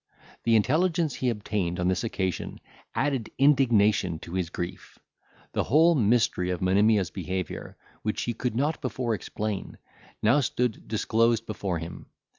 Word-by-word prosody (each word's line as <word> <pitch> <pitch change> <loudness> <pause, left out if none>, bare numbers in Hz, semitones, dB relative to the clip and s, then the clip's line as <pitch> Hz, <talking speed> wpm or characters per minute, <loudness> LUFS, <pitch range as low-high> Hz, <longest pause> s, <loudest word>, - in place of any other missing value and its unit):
The 115 -1 +4
intelligence 160 - +2
he 130 - -1
obtained 100 -5 -2
on 90 - +1
this 95 -1 +1
occasion 95 -5 -3 0.4
added 135 -5 0
indignation 110 - +3
to 85 - -9
his 90 -3 -1
grief. 90 +1 -6 0.6
The - - 0
whole 160 +6 +5
mystery 110 - +2
of 90 -1 -1
Monimia's 100 +1 +3
behaviour, 95 -1 -5 0.2
which 110 - -2
he 120 - -1
could 120 0 -3
not 150 +6 0
before 130 -3 -2
explain, 105 -1 -4 0.5
now 115 +7 +5
stood 125 -3 -1
disclosed 115 +1 +1
before 100 -5 -3
him. 85 +1 -8
110 Hz, 140 wpm, -27 LUFS, 95-125 Hz, 0.6 s, whole